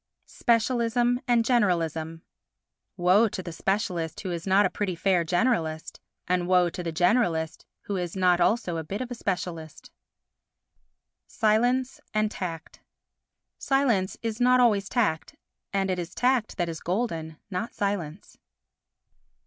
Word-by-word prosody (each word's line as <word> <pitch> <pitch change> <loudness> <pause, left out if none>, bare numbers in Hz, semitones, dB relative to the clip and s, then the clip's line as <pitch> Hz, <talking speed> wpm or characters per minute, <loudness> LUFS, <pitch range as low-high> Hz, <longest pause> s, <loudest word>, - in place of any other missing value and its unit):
Specialism 240 +1 +1
and 235 -2 +3
Generalism 165 - 0 0.8
Woe 185 +5 +4
to 190 -3 -5
the 175 - -6
specialist 175 -3 -2
who 190 -3 -4
is 170 +1 -5
not 195 +2 +4
a - - +2
pretty 195 -4 -2
fair 180 0 +2
generalist, 165 -4 -1 0.3
and 180 -1 0
woe 180 -1 +3
to 180 - -5
the 170 -1 -3
generalist 170 -2 +1 0.2
who 200 - -4
is 175 -1 -4
not 180 -2 +3
also 175 -3 +1
a 160 - -3
bit 195 +8 -5
of 255 -1 -5
a - - -1
specialist. 175 -8 -5 1.4
Silence 245 +4 +1 0.2
and 215 0 +1
Tact 165 -6 -6 0.8
Silence 245 -9 +1
is 225 +1 -3
not 250 +1 +5
always 210 -5 +3
tact 210 -11 0 0.4
and 195 -1 0
it 180 - -2
is 175 0 -6
tact 250 -3 +1
that 175 -2 0
is 165 -1 -5
golden, 165 -5 -3
not 205 +6 -3
silence. 200 -4 -4
190 Hz, 140 wpm, -26 LUFS, 170-230 Hz, 1.4 s, not